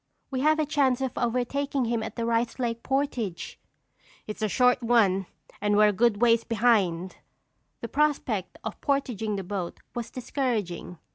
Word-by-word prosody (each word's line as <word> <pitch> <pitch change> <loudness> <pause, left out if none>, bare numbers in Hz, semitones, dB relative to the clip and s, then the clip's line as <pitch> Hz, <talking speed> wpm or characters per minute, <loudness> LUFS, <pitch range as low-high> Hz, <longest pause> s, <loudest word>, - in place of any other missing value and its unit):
"We 260 - -1
have 310 +3 +3
a 310 - +1
chance 275 -4 +2
of 265 -1 -2
overtaking 255 +3 0
him 230 -1 0
at 220 0 -6
the 230 - -2
Rice 230 0 0
Lake 235 -2 -2
portage." 255 -10 -2 0.7
"It's 215 0 -7
a 215 - +1
short 250 +3 +3
one 205 -6 +3 0.3
and 205 0 +2
we're 210 0 +6
a - - 0
good 215 0 +2
ways 230 -1 +4
behind." 200 -6 +1 0.6
The 235 - -4
prospect 260 -9 0
of 220 - -6
portaging 245 -7 -1
the 195 - -3
boat 185 -2 -4
was 240 -1 -4
discouraging. 225 -10 -3
230 Hz, 160 wpm, -27 LUFS, 210-255 Hz, 0.7 s, we're